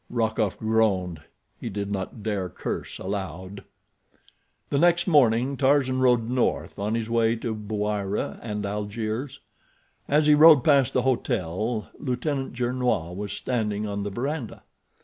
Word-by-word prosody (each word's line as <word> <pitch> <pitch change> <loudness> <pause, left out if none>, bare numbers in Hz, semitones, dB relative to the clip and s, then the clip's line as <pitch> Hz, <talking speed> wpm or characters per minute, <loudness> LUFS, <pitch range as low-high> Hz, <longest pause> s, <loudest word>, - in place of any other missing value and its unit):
Rokoff 110 -3 0
groaned. 100 -7 +1 0.4
He - - -5
did 100 0 -4
not 100 +2 -4
dare 100 -4 -2
curse - - -5
aloud. 95 0 -5 1.1
The 140 - +2
next 175 +1 +4
morning 130 -4 +3
Tarzan 130 -1 +2
rode 125 -3 +3
north 125 -4 -1
on 105 +3 -1
his 115 -1 -2
way 115 0 +2
to 115 0 -3
Bouira 105 -1 -3
and 105 -2 -4
Algiers. 110 +6 -4 0.7
As 150 +2 +3
he 150 - +5
had 150 - +3
ridden 155 -4 +9
past 135 -3 +4
the 125 - +2
hotel 110 -3 -1
Lieutenant 135 +1 -2
Gernois 120 -8 -1
was 100 +2 -5
standing 110 -4 -2
on 100 -1 -3
the 100 - -3
veranda. 125 +3 -4
110 Hz, 140 wpm, -25 LUFS, 100-130 Hz, 1.1 s, ridden